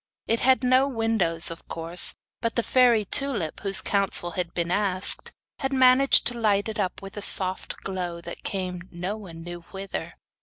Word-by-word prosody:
It 230 +1 0
had 260 0 +3
no 255 +2 +3
windows, 225 -10 +1
of 165 - -10
course; 165 +2 +2 0.3
but 230 - -2
the 235 - 0
fairy 240 -4 +3
Tulip, 215 - +1
whose 195 -1 0
counsel 195 -3 +1
had 175 0 -4
been 170 0 -3
asked, 190 -1 0 0.3
had 270 -1 -2
managed 260 +1 +5
to 240 0 +3
light 205 -2 +1
it 215 -1 -5
up 190 -1 -3
with 195 +1 -10
a - - -4
soft 190 -2 +2
glow 180 -3 -4
that 170 0 -9
came 185 -2 -4
no 180 +4 -4
one 170 -6 -10
knew 175 0 -8
whither. 195 0 -6
195 Hz, 180 wpm, -25 LUFS, 175-230 Hz, 0.3 s, managed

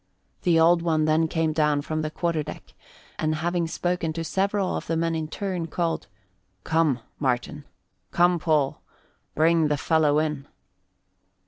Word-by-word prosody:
The 170 -2 +3
Old 170 +1 +5
One 160 -2 +1
then 155 +1 +3
came 160 -1 0
down 150 -2 +1
from 155 +1 -2
the 155 - -2
quarter 165 0 -1
deck, - - -9 0.5
and, 155 0 0
having 170 +2 -1
spoken 175 -1 -2
to 165 +1 -3
several 195 +2 0
of - - -5
the 165 - 0
men 165 0 0
in 160 -1 -2
turn, 180 -1 -3
called, 165 - -2 0.6
"Come, 160 -6 +1 0.2
Martin; 135 +2 -2 0.4
come, 175 - +3
Paul, 150 -4 +1 0.5
bring 160 0 +3
the 150 0 0
fellow 150 -1 +2
in." 150 -2 -1
160 Hz, 150 wpm, -25 LUFS, 155-170 Hz, 0.6 s, Old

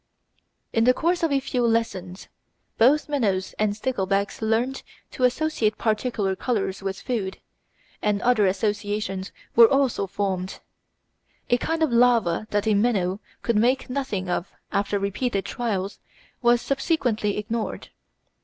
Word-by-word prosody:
In 225 0 +3
the 250 0 +5
course 345 +2 +1
of 330 -3 +1
a 275 - +3
few 255 -2 -2
lessons, 205 -6 -1 0.5
both 270 +7 +5
minnows 205 -10 0
and 210 -1 +1
sticklebacks 200 -4 -1
learned 230 +5 0 0.3
to 255 - +1
associate 250 -5 +1
particular 215 -3 0
colours 195 -4 -2
with 195 0 -3
food, 210 -7 -3 0.6
and 210 -1 +1
other 235 -5 +4
associations 205 -1 -2 0.2
were 230 -1 +9
also 270 -7 +2
formed. 190 -1 -3 0.9
A 245 - +5
kind 325 +4 0
of 290 -6 +1
larva 230 -6 +3
that 205 0 0
a 220 - +3
minnow 200 -3 +1 0.2
could 235 -2 +1
make 250 +4 +2
nothing 250 -9 -2
of 180 +1 -2 0.2
after 200 +1 0
repeated 200 +1 -1
trials 205 -5 -3 0.4
was 240 -1 +4
subsequently 265 - 0
ignored. 220 +2 -3
220 Hz, 135 wpm, -24 LUFS, 200-250 Hz, 0.9 s, were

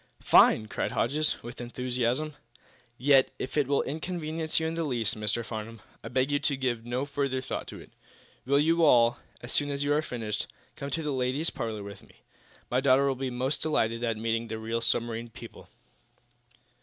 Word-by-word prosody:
"Fine!" 110 - +6
cried - - -2
Hodges, 150 +5 0
with 120 +1 -8
enthusiasm. 125 +4 -1 0.6
"Yet, 135 0 +5
if 130 - -5
it 145 -3 +2
will 140 0 +2
inconvenience 160 +1 -2
you 160 - -1
in 160 - -1
the 165 0 -1
least, 120 -8 +1
Mr. 110 +2 -1
Farnum, 115 0 -6 0.2
I - - -6
beg 130 +2 +1
you 145 - +2
to 145 -2 0
give 120 -3 -2
no 125 +3 -1
further 140 -2 -1
thought 130 - -4
to - - -8
it. - - -14 0.5
Will 140 +2 +3
you 165 +3 +3
all, 120 -6 +5 0.2
as 120 - -8
soon 145 0 +1
as 140 0 -1
you 145 0 +2
are 150 - +3
finished, 115 -7 -3 0.3
come 140 -2 -5
to 160 +4 -2
the 150 -2 -1
ladies' 130 +5 0
parlor 110 -3 -4
with 100 0 -9
me? - - -22 0.5
My 125 +1 +2
daughter 135 0 +5
will 135 - +2
be 130 0 -3
most 130 +3 -1
delighted 115 -7 0
at 115 -2 0
meeting 115 +1 -1
real 110 +1 -3
submarine 115 0 0
people." - - -12
130 Hz, 190 wpm, -28 LUFS, 115-145 Hz, 0.6 s, Fine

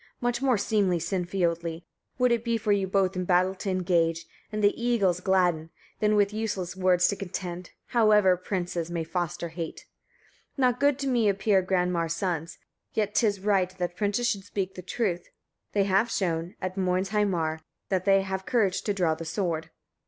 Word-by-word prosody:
"Much 245 0 -1
more 260 -4 +3
seemly, 200 -3 +1
Sinfiotli! 170 -1 -2 0.3
would 250 -1 +3
it 235 -1 +1
be 230 -1 0
for 210 -1 -1
you 200 -2 +2
both 190 0 +1
in 185 - -1
battle 180 +1 +3
to 195 +1 -5
engage, 170 -3 +1 0.3
and 215 0 -2
the 205 - +5
eagles 200 -8 +2
gladden, 180 -4 +1 0.3
than 210 0 +3
with 205 0 +2
useless 200 -5 -3
words 180 -1 +3
to 200 - 0
contend, 180 -2 -6 0.2
however 210 -5 +5
princes 175 -2 -3
may 170 -1 -2
foster 175 +1 -3
hate. 165 -1 -6 0.7
45. - - -40
Not 250 -2 +2
good 285 -1 +3
to 275 -1 -3
me 235 -5 +3
appear 195 0 +2
Granmar's 180 -3 0
sons, 170 -3 -3 0.4
yet 210 -1 0
'tis 205 -5 +1
right 195 -3 +2
that 175 -1 -3
princes 205 +4 0
should 200 -4 -1
speak 195 -1 -3
the 180 - -8
truth: 180 -2 -2 0.5
they 200 - +3
have 195 +4 +2
shown, 170 -3 -2
at 185 0 -4
Moinsheimar, 185 -3 0 0.3
that 185 -1 0
they 195 -1 +5
have 190 0 -3
courage 210 -7 +1
to 205 - -2
draw 175 -5 +2
the 160 - -6
sword." 165 -2 -2
46. 160 - -28
190 Hz, 180 wpm, -27 LUFS, 175-205 Hz, 0.7 s, the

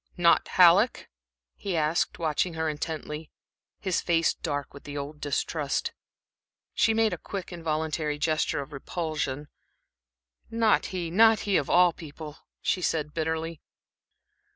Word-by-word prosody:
"Not 170 -1 +4
Halleck?" 185 +6 +5 0.5
he 190 -4 -3
asked, 155 +2 +1
watching 165 +1 0
her 160 0 -1
intently, 155 0 -4 0.5
his 190 -3 0
face 165 -2 +2
dark 145 -3 -4
with 140 - -12
the 145 0 -6
old 145 +1 -6
distrust. 145 0 -1 0.8
She 225 - +3
made 220 -1 +2
a - - -5
quick, 190 -2 -6
involuntary 155 -2 -2
gesture 155 -1 0
of 145 +2 -14
repulsion. 150 -1 -3 1.0
"Not 225 -1 +2
he 175 -3 -4
not 220 +4 +5
he, 200 -2 0
of 145 - +1
all 180 -1 +5
people," 155 -1 -9 0.3
she 185 - +1
said, 150 -3 -1
bitterly. 160 0 -2
160 Hz, 130 wpm, -27 LUFS, 150-175 Hz, 1.0 s, Halleck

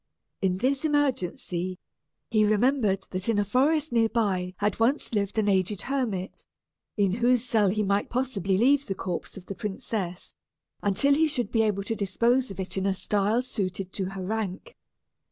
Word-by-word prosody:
In 185 -2 +1
this 265 +7 0
emergency, 185 - -1 0.5
he 215 -2 +4
remembered 215 -2 +2
that 185 +4 -1
in 225 - +2
a 205 - +2
forest 290 +8 +2
near 230 -1 +3
by 190 -5 0
had 205 0 -1
once 240 +3 +1
lived 205 0 -1
an 215 -1 +2
aged 190 0 +1
hermit, 235 -9 -2 0.5
in 200 -2 +3
whose 240 +3 +2
cell 220 -5 +2
he 210 +2 0
might 200 0 0
possibly 210 -7 0
leave 275 +6 +3
the 195 - -2
corpse 180 0 -5
of 185 - -10
the 195 - -5
princess, 195 -3 -4 0.5
until 240 +8 +3
he 315 +3 +3
should 250 -8 -1
be 225 - +3
able 205 -3 0
to 215 - -2
dispose 235 +6 +1
of 195 - -9
it 190 0 -3
in 190 +1 0
a 195 - +1
style 210 +5 +1
suited 195 -5 -4
to 195 - -2
her 190 0 -5
rank. 220 - -4
210 Hz, 175 wpm, -27 LUFS, 190-245 Hz, 0.5 s, he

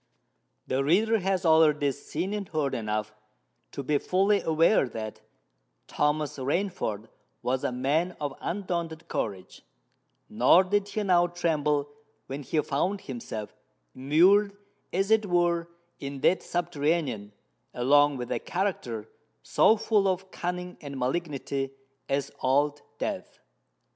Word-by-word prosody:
The 135 +1 0
reader 215 +9 +3
has 190 0 0
already 155 -3 +5
seen 165 +7 -4
and 205 -3 -4
heard 150 -4 -1
enough 110 -1 -2 0.6
to 140 - -5
be 145 +2 +1
fully 195 +2 +2
aware 160 - +3
that 110 -2 -6 0.6
Thomas 150 -1 0
Rainford 135 - -2 0.4
was 130 +1 0
a - - 0
man 145 +8 0
of 145 -2 -3
undaunted 170 -3 -3
courage: 95 -4 -4 0.7
nor 125 - +5
did 205 +1 0
he 210 +1 -2
now 175 -3 +4
tremble 150 -4 0 0.4
when 135 +2 -5
he 150 +3 -1
found 185 +8 -1
himself 115 -5 -6 0.4
immured, 190 +9 +4 0.3
as 195 +3 0
it 220 -1 +4
were, 175 -1 +2 0.3
in 140 -1 -6
that 185 - +3
subterranean, 150 -10 -1 0.4
along 145 +3 +4
with 125 -1 -5
a - - 0
character 150 - -3 0.4
so 220 - +4
full 210 -2 +2
of 190 0 -2
cunning 180 0 -4
and 140 -2 -7
malignity 135 0 -2 0.4
as 140 0 -1
Old 145 +3 +2 0.2
Death. - - -4
155 Hz, 125 wpm, -27 LUFS, 135-180 Hz, 0.7 s, already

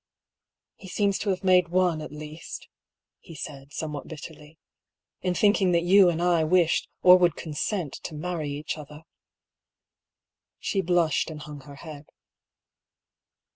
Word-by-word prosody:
" - - -63 0.3
He 190 - -12
seems 200 +1 0
to 205 - -2
have 190 0 -1
made 180 -2 +5
one, 175 -2 +1
at 155 - -7
least," 150 +2 -8 0.5
he 165 - -13
said, 140 -1 -8
somewhat 150 -2 -5
bitterly 155 0 -11 0.2
— - - -64
" - - -62
in 180 -1 -1
thinking 200 -3 +3
that 170 0 +3
you 185 +1 +6
and 170 0 -1
I 175 -2 +3
wished 170 +1 +2
—or 180 0 +9
would 175 -3 +3
consent 160 +1 -3
— - - -40
to 155 - -5
marry 160 -1 -3
each 145 +2 -4
other! 150 +1 -11 0.8
" - - -66 0.7
She 195 - -1
blushed 170 -4 +1
and 155 -1 -8
hung 150 -1 -9
her 145 - -11
head. 150 0 -10
165 Hz, 165 wpm, -26 LUFS, 150-180 Hz, 0.8 s, or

